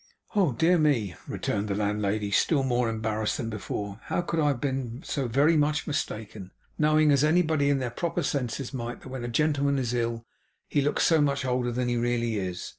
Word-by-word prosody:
'Oh 190 -8 +3
dear 170 +8 +3
me!' 125 - +2
returned 105 0 -2
the 100 - -1
landlady, 105 0 -1
still 140 - +3
more 125 -2 +1
embarrassed 110 -1 -1
than 115 -1 -4
before; 100 -1 -5
'how - - 0
could 170 -1 -2
I 150 -2 +3
be 130 -2 -3
so 135 -4 -2
very 140 +7 +3
much 150 0 +1
mistaken; 110 - -4 0.3
knowing, 155 0 +4
as 140 0 +4
anybody 155 -2 +3
in 140 - +3
their 125 -3 -3
proper 170 +6 -2
senses 135 -1 -2
might 120 -2 -5
that - - -10
when 130 -2 -5
a - - -3
gentleman 140 +2 +1
is 125 -3 -1
ill, 115 -1 -2 0.4
he 145 - +1
looks 145 +2 +1
so 160 -2 +4
much 140 -2 +1
older 125 -1 0
than 125 +1 -1
he 120 0 0
really 120 -2 0
is? 90 -1 -4
125 Hz, 195 wpm, -27 LUFS, 115-145 Hz, 0.4 s, knowing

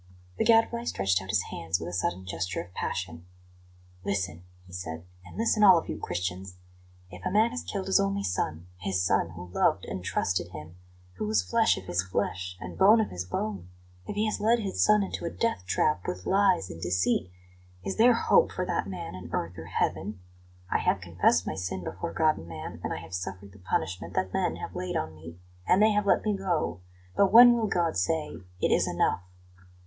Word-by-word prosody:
The - - +2
Gadfly 230 +1 +3
stretched 95 - +1
out 95 - -10
his 95 -2 +2
hands 85 +1 -2
with 80 - -6
a 90 - -6
sudden 90 +1 -2
gesture 90 0 -3
of 90 +1 -8
passion. 85 -3 -4 0.8
"Listen!" 95 -4 -2 0.2
he 90 - -16
said; 85 -2 -6 0.2
"and 90 - -13
listen 220 -1 +2
all 190 -3 +9
of 165 - -3
you, - - -4
Christians! 90 +1 -4 0.6
If - - -11
a - - 0
man 215 +5 +3
has 250 - -4
killed 195 -2 -4
his 190 +1 +3
only 200 0 0
son 85 -2 -2
his 95 +1 -2
son 85 - +2
who 90 +1 -9
loved - - +1
and 90 - -5
trusted 90 0 -1
him, 75 +2 -9 0.4
who 105 - -2
was 105 -3 +2
flesh 90 - +2
of - - -7
his 90 0 0
flesh 90 -1 -3
and - - -8
bone 210 +4 +7
of 220 - 0
his 90 0 -4
bone; 90 0 -4 0.4
if - - -4
he 210 +1 +1
has 215 - -1
led 225 +3 +3
his 200 -4 0
son 210 -1 +5
into 195 - -5
a 170 - -1
death 230 - -2
trap 95 +4 +1
with 90 0 -4
lies 190 - +2
and 80 - -9
deceit 90 +1 +1 0.6
is 195 - -3
there 235 +2 +6
hope - - +4
for - - -2
that - - -1
man 95 -2 -6
in 90 -1 -8
earth 85 +1 -2
or 80 -2 -8
heaven? 95 +4 -2 0.5
I - - +2
have - - +1
confessed - - +2
my - - -2
sin 90 0 -4
before 170 - -5
God 155 -1 +2
and 80 - -10
man, 80 -2 -8
and - - -3
I - - -2
have - - -10
suffered 95 +2 -5
the 100 - -16
punishment 90 0 -3
that 95 0 -1
men - - 0
have - - -7
laid 90 - -2
on 80 0 -3
me, 80 +2 -11 0.3
and 185 - +5
they 215 +1 +5
have 210 -1 +1
let - - +3
me 210 -1 +1
go; 170 - -1 0.4
but 195 -1 +4
when 240 +2 +10
will 230 -2 0
God 175 -4 0
say, 150 - -1 0.2
'It - - +1
is - - +3
enough'? 90 0 0
95 Hz, 215 wpm, -28 LUFS, -, 0.8 s, when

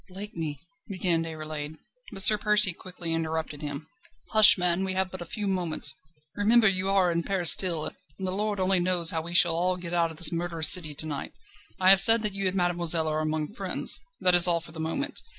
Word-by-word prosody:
"Blakeney 170 -7 -8 0.2
..." - - -46
began 180 -4 -2
Déroulède. 155 -2 -8 0.4
But 195 - +4
Sir 215 0 +5
Percy 210 -3 +3
quickly 175 -2 -8
interrupted 160 -2 -5
him: 145 0 -8 0.5
"Hush, 215 -2 +8
man! 180 +1 0
we 190 0 -4
have 190 0 -3
but 185 - -9
a 175 - -9
few 210 +2 -6
moments. 180 -5 -3 0.4
Remember 220 +2 +2
you 190 0 -1
are 190 -3 0
in 170 0 -3
Paris 180 -2 +3
still, 170 -5 +2
and 170 +6 -11
the - - -2
Lord 205 +1 -4
only 185 0 +1
knows 175 -1 0
how 165 -2 -4
we 170 +2 -8
shall 170 -1 +5
all 180 +2 -2
get 175 -1 -8
out 170 -1 -1
of 160 - -14
this 170 - +3
murderous 170 -2 +1
city 155 -5 +3
to 155 - -6
night. 145 -3 -7 0.5
I 185 0 +4
have 195 0 +5
said 225 +1 +7
that 210 -2 0
you 195 -1 -3
and 185 - -4
mademoiselle 175 -3 -1
are 155 0 -3
among 155 +2 -5
friends. - - -2 0.2
That 180 - +2
is 175 0 +7
all 170 -1 +2
for 165 -1 -14
the 160 - -12
moment. 165 - -5
175 Hz, 220 wpm, -24 LUFS, 160-190 Hz, 0.5 s, Hush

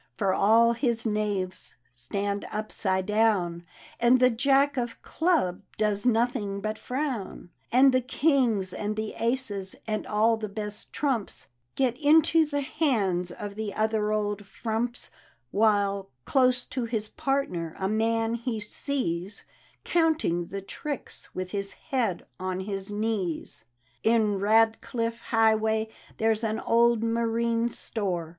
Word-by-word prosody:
For 195 -1 +1
all 225 +4 +5
his 235 -2 0
knaves 205 -4 -2 0.2
stand 200 +12 -3
upside 200 -3 -1
down, 195 -6 +1 0.3
And 240 +2 +5
the 255 0 +5
Jack 275 +4 +3
of 240 -3 -3
Clubs 320 - +1 0.2
docs 210 +1 +1
nothing 225 -4 +1
but 215 +1 -3
frown; 250 -10 -4 0.2
And 265 +3 +6
the 255 - +3
Kings 250 - +1
and 210 0 -3
the 215 0 -3
Aces, 230 -6 -1
and 215 -1 -2
all 220 +2 +3
the 215 -1 -5
best 210 0 -6
trumps 260 -8 -2 0.3
Get 255 -3 +1
into 315 +1 +5
the 285 -1 -1
hands 215 - 0
of 200 +3 -6
the 210 -1 -4
other 215 -1 +1
old 205 -1 -1
frumps; 235 +3 -2 0.4
While, 200 -2 +2 0.2
close 255 -2 +3
to 255 -2 -3
his 220 -2 -2
partner, 270 - -2
a 190 - -1
man 225 +2 +1
he 235 -1 -2
sees 205 - -3 0.4
Counting 315 - +1
the 195 +2 -5
tricks 285 +7 -6
with 185 0 -4
his 200 -1 -3
head 230 -10 -2
on 185 0 -2
his 195 0 -4
knees. 205 - -3 0.4
In 220 -3 +2
Ratdiflc 225 +2 +2
Highway 220 -1 +2 0.3
there's 220 0 +1
an 220 0 -1
old 235 -1 +3
marine 230 0 +1
store. 185 -8 -3
220 Hz, 130 wpm, -27 LUFS, 200-240 Hz, 0.4 s, And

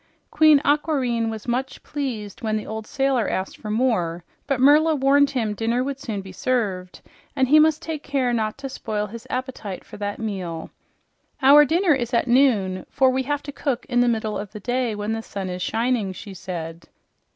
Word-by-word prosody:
Queen 310 -2 +6
Aquareine 270 -6 +1
was 220 0 -7
much 255 +3 -2
pleased 235 -9 -5
when 220 -2 0
the 215 - -5
old 220 0 -6
sailor 270 -4 +1
asked 190 0 -3
for 215 - -8
more, 210 -8 0 0.2
but 275 -3 0
Merla 305 +4 +5
warned 280 +1 +4
him 235 -6 -1
dinner 230 +4 0
would 275 0 -4
soon 215 -7 -4
be 190 0 -10
served 190 -5 -2 0.3
and 265 -2 +2
he 305 +2 +7
must 310 0 +3
take 315 -3 -4
care 265 -4 0
not 215 -2 -1
to 275 0 -6
spoil 215 -5 -3
his 225 +3 -10
appetite 255 -7 -5
for - - -12
that 205 0 -3
meal. 185 -7 -5 0.7
"Our 290 +2 +8
dinner 335 +3 +3
is 240 -3 -1
at 235 - +1
noon, 220 -8 +2
for 260 -1 +3
we 260 +1 0
have 290 0 -1
to 285 - -6
cook 270 -3 -2
in 245 -1 +2
the 245 - +4
middle 220 -2 -1
of 205 -1 -7
the 210 - -7
day 245 0 -1
when 210 +1 -2
the 225 - -3
sun 195 -4 -5
is 180 0 -5
shining," 225 -2 0
she 200 +1 -9
said. 170 -3 -7
235 Hz, 195 wpm, -23 LUFS, 210-270 Hz, 0.7 s, Our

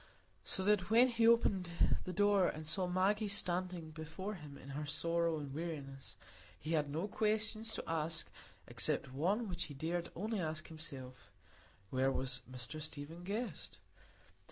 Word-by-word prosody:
So 190 - -2
that 200 -2 +3
when 240 +3 +7
he 230 -1 +3
opened 200 -6 +4 0.4
the 185 - -3
door 205 0 +4
and 155 +1 -4
saw 170 +4 +1
Maggie 195 +4 +2
standing 180 -4 0
before 160 +6 -5
him 150 -7 -9
in 135 - -11
her 145 +2 -3
sorrow 165 +2 +1
and 145 -2 -5
weariness, 140 -4 -5 0.4
he 155 - -4
had 150 -3 +2
no 160 +7 -1
questions 215 +1 +1
to - - -5
ask 165 0 -1 0.4
except 130 - +1
one 195 - +1
which 180 -2 -2
he 145 - -8
dared 170 +4 -2
only 215 +3 -1
ask 155 -2 -3
himself,—where 130 - -5
was 130 -1 +1
Mr 130 +5 -2
Stephen 155 +3 -5
Guest? 215 +6 -4
170 Hz, 150 wpm, -36 LUFS, 150-200 Hz, 0.4 s, when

